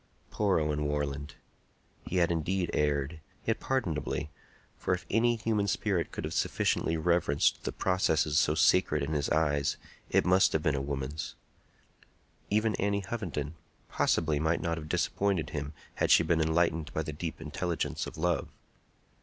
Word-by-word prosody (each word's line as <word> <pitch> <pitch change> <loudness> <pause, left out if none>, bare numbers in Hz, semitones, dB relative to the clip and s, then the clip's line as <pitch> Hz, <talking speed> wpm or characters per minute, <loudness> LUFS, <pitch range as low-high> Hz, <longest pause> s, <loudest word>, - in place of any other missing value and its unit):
Poor 100 -5 +2
Owen 75 -1 -1
Warland! 75 -1 -2 0.7
He - - -3
had 85 -2 +3
indeed 85 +3 -1
erred, 75 +1 0 0.3
yet - - 0
pardonably; 85 - -2 0.4
for 90 - 0
if 90 - -10
any 120 +2 +3
human 110 -2 0
spirit 95 - 0
could - - -5
have - - -4
sufficiently 80 - +1
reverenced 80 -3 +2
the - - -1
processes 80 -5 +2
so 75 - +2
sacred 80 -2 +3
in 75 +3 -2
his 75 -2 0
eyes, 75 -2 +1 0.3
it - - +3
must 95 +1 +4
have 80 - 0
been 75 - +2
a 70 - -1
woman's. 70 +1 -4 1.1
Even 110 +1 +2
Annie 100 0 0
Hovenden, 85 -10 -3 0.4
possibly 80 -3 +1
might 80 +2 +1
not 85 0 -2
have 75 -1 -9
disappointed 95 -4 0
him 70 -1 -4 0.2
had - - 0
she - - +7
been 80 -2 +2
enlightened 80 0 +1
by 80 - 0
the 75 - -5
deep 80 +2 -5
intelligence 80 +2 -3
of - - -9
love. 85 +1 0
80 Hz, 155 wpm, -30 LUFS, 75-90 Hz, 1.1 s, she